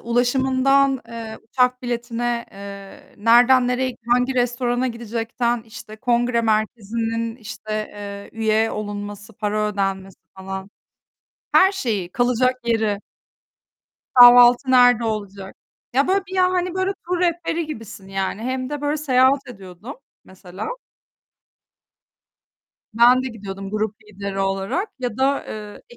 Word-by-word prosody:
ulaşımından, 265 +2 +2
eee, 225 -1 -7
uçak 250 +2 0
biletine, 240 0 -2
eee, 200 0 -11
nerden 245 +3 +5
nereye, 250 0 -1
hangi 250 +2 +2
restorana 245 0 0
gidecekten, 235 0 -2
işte, 220 -1 -11
kongre 240 0 +1
merkezinin, 225 +1 -1
işte, 225 -2 -10 0.6
eee, - - -15
üye 220 0 +2
olunması, 205 0 -6
para 210 0 -1
ödenmesi 195 -1 -3 0.2
falan. 190 +1 -7 0.8
Her 380 +1 +6
şeyi, 215 - -3
kalacak 250 +1 +2
yeri. 220 -3 0 1.2
Kahvaltı 245 +1 +8
nerede 245 -2 +5
olacak? 200 -3 -5 0.4
Ya, 275 +5 +2
böyle 385 0 +1
bir 380 - -8
ya 365 -1 +3
hani 365 -1 -1
böyle 375 +1 0 0.2
tur 360 0 0
rehberi 340 -1 0
gibisin, 220 -9 -9
yani. 195 +2 -3
Hem 255 +2 -3
de 295 - -4
böyle 290 +1 -1
seyahat 270 -1 +2
ediyordum, 195 +3 -10 0.3
mesela. 190 0 -9 2.3
Ben 245 +3 +5
de 260 - -3
gidiyordum 195 -4 -8
grup 215 0 -2
lideri 200 -2 -7
olarak 195 - -1
ya 245 -3 -4
da 275 +1 +1
eee, 210 -1 -8
235 Hz, 120 wpm, -21 LUFS, 210-255 Hz, 2.3 s, Kahvaltı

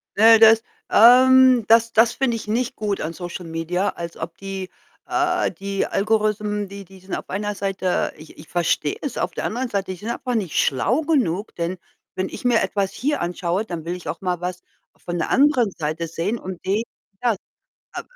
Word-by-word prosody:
Äh, 225 +1 +7
das 225 0 +7 0.3
ähm, 255 0 +7
das 230 +1 +5
das 225 +1 +4
finde 240 -4 0
ich 215 - -9
nicht 240 +4 -1
gut 205 -2 -2
an 160 +2 -3
SocialMedia, 175 +1 -3
als 170 -1 -7
ob 165 0 -7
die 195 -1 -6 0.4
äh, 360 0 0
die 195 +2 -3
Algorithmen, 210 -1 0
die 200 0 -9
die 190 +1 -16
sind 190 +1 -9
auf - - -7
einer 205 +2 -2
Seite 195 -2 -1
ich 155 0 -14
ich 155 - -13
verstehe 170 -4 0
es, 280 -5 -4
auf - - -1
der - - -5
anderen 245 +3 -2
Seite, 195 -3 -2
die 185 - -6
sind 215 +5 -7
einfach 250 +1 -3
nicht 195 -8 -2
schlau 210 - +2
genug, 245 - 0
denn 170 +2 -3 0.4
wenn 185 - -2
ich - - -9
mir 240 -2 +4
etwas 195 -2 -1
hier 290 +4 -1
anschaue, 175 +3 -1
dann 170 -5 -6
will 175 +1 -3
ich 180 - -10
auch - - -4
mal 180 -2 -1
was 180 0 -4 0.3
von 175 0 -5
der 165 - -2
anderen 265 -6 +3
Seite 155 +2 -3
sehen 170 +8 -2
und 185 -2 -8
die 205 +4 +1 0.4
ja, 240 -2 +2 0.6
äh - - -3
200 Hz, 195 wpm, -22 LUFS, 180-230 Hz, 0.6 s, Äh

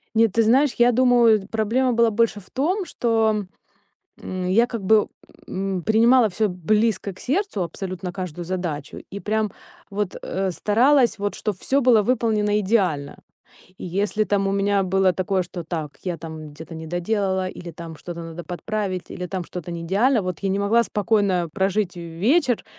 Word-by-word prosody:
Нет, 225 -3 +4
ты 230 - +3
знаешь, 260 +5 +4
я 240 +1 +5
думаю, 235 -4 +4
проблема 230 +4 +1
была 230 0 +4
больше 225 0 +1
в 185 - -20
том, 355 - 0
что, 220 - 0 0.7
м, 185 -1 -4
я, 230 +6 +4
как 230 -4 -5
бы, 210 +2 +4 0.4
м, 190 -1 -2
принимала 230 +3 +5
всё 210 +3 0
близко 205 +3 0
к 185 - -16
сердцу, 310 - -1
абсолютно 180 +1 -5
каждую 180 -3 -5
задачу, 170 -5 -4
и 200 - -5
прям 215 -1 -1 0.4
вот, 205 -1 -3
а, 190 0 -1
старалась, 240 - +3
вот 205 0 -2
чтобы 205 -4 -3
всё 275 +1 +1
было 235 -4 +5
выполнено 215 -3 +1
идеально. 185 -9 0 0.6
И - - -7
если 205 +4 0
там 195 0 +1
у 195 - 0
меня 200 0 +2
было 190 0 +2
такое, 185 +1 0
что: 175 0 -7
"Так, 155 -3 -5
я 180 -2 -2
там 160 -1 -8
где-то 160 +3 -10
не 160 0 -7
доделала", 190 +2 -1
или 175 -1 -8
там 165 0 -9
что-то 170 +1 -7
надо 165 +1 -7
подправить, 185 +1 -4
или 180 - -5
там 185 -1 -4
что-то 175 0 -7
не 170 -1 -5
идеально, 210 +8 +2
вот 180 -3 -4
я 195 - 0
не 195 - 0
могла 220 +4 +3
спокойно 200 -4 +1
прожить 195 -1 0
вечер, 220 - +1
200 Hz, 175 wpm, -23 LUFS, 180-225 Hz, 0.7 s, я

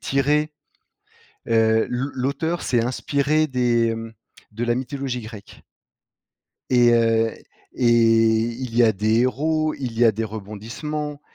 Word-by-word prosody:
tirée. 150 +3 0 1.0
Heu, 110 -1 +3
l'au 130 +3 -2
l'auteur 140 +6 -2
s'est 120 -2 +1
inspiré 145 +4 0
des, 120 -3 +1
mmh, 115 0 -8 0.4
de 115 +3 -3
la 120 0 +1
mythologie 130 -1 -4
grecque. 110 -2 -12 1.1
Et 120 -1 +5
heu 115 -1 +2 0.4
et 120 -2 +2
il 115 +1 +2
y 120 - +6
a 110 - +4
des 110 +3 +1
héros, 155 +4 0
il 120 -4 -6
y 120 - +4
a 110 - +5
des 110 +2 -3
rebondissements. 115 +9 -6
120 Hz, 130 wpm, -22 LUFS, 115-140 Hz, 1.1 s, y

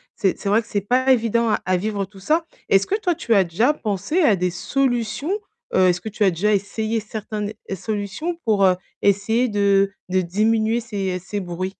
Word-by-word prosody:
C'est 190 -3 0
c'est 200 - -2
vrai 215 +3 +4
que 220 - -18
c'est 205 - -1
pas 255 +6 +2
évident 230 -2 +2
à 210 - +1
à 185 0 +2
vivre, 200 +1 -2
tout 195 0 -16
ça. 315 - +1 0.2
Est-ce 195 0 +4
que 405 - +1
toi, 360 -5 0
tu 235 - 0
as 195 - +5
déjà 220 - +2
pensé 225 - -1
à 225 -10 +5
des 180 0 -1
solutions? 250 - -1 0.4
Heu, 185 0 +5
est-ce 180 0 +1
que 220 - -5
tu 215 0 -1
as 190 - +4
déjà 205 +6 +1
essayé 220 +3 -1
certain 215 0 -6
ne 205 0 -2 0.2
es 195 - -2
solutions 210 - -3
pour, 205 -3 +3
heu, 185 - +5 0.3
essayer 205 +5 +2
de 200 -1 +2 0.2
de 185 0 +2
diminuer 220 +5 +1
ces 195 -5 -3
ces 200 +3 -5
bruits? 185 0 -4
210 Hz, 215 wpm, -22 LUFS, 195-230 Hz, 0.4 s, as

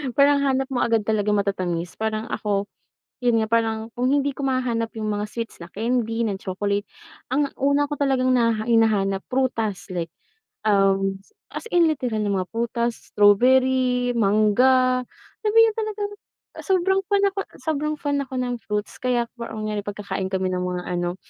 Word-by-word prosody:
parang 285 0 +5
hanap 270 -1 +1
mo 250 - 0
agad 225 -2 +2
talagang 210 -1 +1
matatamis 180 -3 -2
parang 220 0 -2
ako, 205 -1 -1 0.6
yun 240 -2 +3
nga 220 - 0
parang 225 -1 0
kung 250 +2 +1
hindi 285 0 +2
ko 280 - -5
mahahanap 250 -4 0
yung 215 - -2
mga 205 0 -1
sweets 230 0 -5
na - - -9
candy, 230 +1 -1
na 200 - -1
chocolate 200 +2 -2 0.5
ang 285 +2 +2
una 280 +1 +2
ko 295 - -3
talagang 260 -3 +2
hina 230 -2 +1
hinahanap 210 -4 +2
prutas 230 -6 -1
like 170 -1 -3 0.5
uhm, 195 -2 +2 0.3
as - - -6
in 350 -1 +5
literal 245 -7 -2
na 205 - 0
mga 185 -2 -1
prutas, 235 0 -1 0.2
strawberry, 250 +3 +4
mangga, 250 +5 +3 0.4
na 430 - +2 0.3
talaga 430 -1 -3 0.6
sobrang 385 0 +2
fan 400 0 +3
ako, 390 - -5 0.2
sobrang 305 -1 -1
fan 285 -1 -1
ako 270 - -12
ng 245 -1 -1
fruits. 210 -1 -3
Kaya 245 -2 +1
ang 225 -2 -5
nangyayari 210 -1 -2
kapag 205 0 -6
kakain 190 -1 -2
kami 190 -1 0
ng 180 0 -1
mga-ano, 180 -1 -2
230 Hz, 160 wpm, -23 LUFS, 205-260 Hz, 0.6 s, parang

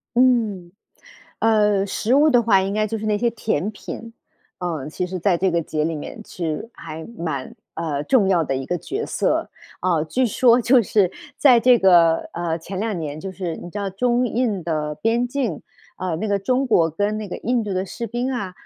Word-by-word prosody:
嗯。 225 -8 +2 0.7
呃， 210 -3 +3
食 215 +4 0
物 295 +3 +5
的 245 -5 +4
话 205 -4 +4
应 195 +1 -2
该 215 0 +1
就 225 +1 -3
是 215 - -5
那 210 -1 +2
些 235 +3 +1
甜 215 -5 -2
品。 225 +2 -8 0.5
呃， 165 -6 -3
其 180 +3 -3
实 185 +1 -5
在 175 0 +2
这 190 +1 +2
个 170 -1 +1
节 155 0 -2
里 165 +1 -1
面 150 +8 -8
是 165 +4 -4
还 160 -1 -8
蛮 155 -7 -4 0.2
呃， 155 -4 -2
重 220 - +3
要 175 -4 +3
的 135 - -2
一 135 0 -3
个 180 - -1
角 420 - -4
色。 - - 0 0.3
啊， 170 -4 +1
据 250 +11 +1
说 240 +2 +4
就 245 +1 +4
是 195 -3 +2 0.3
在 255 -4 +6
这 245 +1 +5
个， 175 -4 +6 0.2
呃， 170 -1 -2
前 185 +3 -7
两 210 -2 -2
年 150 -2 -5
就 190 +3 -6
是 180 -4 -4
你 175 - -9
知 205 - -5
道 200 -1 -2
中 240 +5 +1
印 225 -6 -1
的 155 -2 -2
边 230 +5 +1
境， 245 - -2 0.3
啊， 185 -3 -2
那 215 +6 -3
个 200 -1 +1
中 255 +7 0
国 165 -9 +3
跟 205 +6 -1
那 215 -1 -4
个 185 - -6
印 240 -1 0
度 205 - -3
的 185 +1 -1
士 235 +5 -5
兵 240 +4 -2
啊， 200 -8 -3
195 Hz, 225 characters per minute, -22 LUFS, 170-230 Hz, 0.7 s, 在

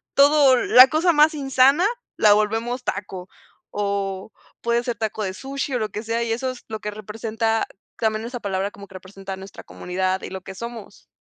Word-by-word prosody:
todo 280 -1 +6
la 255 +1 +7
cosa 320 +5 +2
más 305 +1 +5
insana 275 +3 +3 0.3
la 210 - +5
volvemos 225 +4 0
taco 190 -4 -5 0.4
o 200 -1 -3 0.3
puede 235 0 +1
ser 240 -1 -2
taco 220 -1 -3
de 190 -2 -3
sushi 275 +3 -4
o - - 0
lo 215 -1 -2
que 210 - -5
sea, 230 +1 -2
y 230 - -2
eso 250 +3 -1
es 255 -1 -8
lo 220 -1 -4
que 210 - -5
representa 220 +2 -2 0.3
también 220 0 0
esa 245 +1 -5
palabra 195 0 -2
como 200 0 -12
que 190 - -16
representa 195 +1 -8
nuestra 190 0 -11
comunidad 185 +1 -3
y - - -6
lo 190 0 -7
que 190 +1 -10
somos. 235 -2 -9
220 Hz, 195 wpm, -22 LUFS, 200-250 Hz, 0.4 s, la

